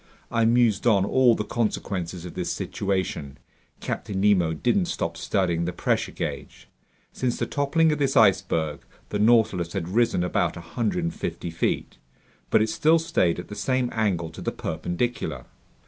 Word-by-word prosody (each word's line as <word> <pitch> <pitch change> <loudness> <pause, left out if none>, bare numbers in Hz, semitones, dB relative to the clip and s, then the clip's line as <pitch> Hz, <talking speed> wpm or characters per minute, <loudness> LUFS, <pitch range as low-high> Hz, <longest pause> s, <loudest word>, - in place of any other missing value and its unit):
I 115 -1 +2
mused 120 -1 +3
on 100 -4 +4
all 125 +1 +4
the - - -2
consequences 95 -6 -3
of 90 - -8
this - - -3
situation. 95 -8 -3 0.4
Captain 100 -2 -3
Nemo 95 -5 +3
didn't 125 - +1
stop - - -2
studying 85 -4 0
the 90 - -1
pressure - - 0
gauge. - - -6 0.5
Since 125 -2 -1
the - - -1
toppling 155 +3 +2
of 150 - -1
this 135 -1 +1
iceberg, 95 -8 +3 0.3
the 105 - -2
Nautilus 105 -6 +3
had 90 -4 -3
risen 115 -3 +2
about 90 - 0
150 105 - -3
feet, 80 - -2 0.5
but 110 - +4
it 110 - -1
still 155 +9 +4
stayed 160 - +1
at 90 - -7
the - - -7
same 125 +4 0
angle 95 -7 0
to - - -10
the - - -2
perpendicular. 80 - -3
105 Hz, 155 wpm, -25 LUFS, 85-120 Hz, 0.5 s, on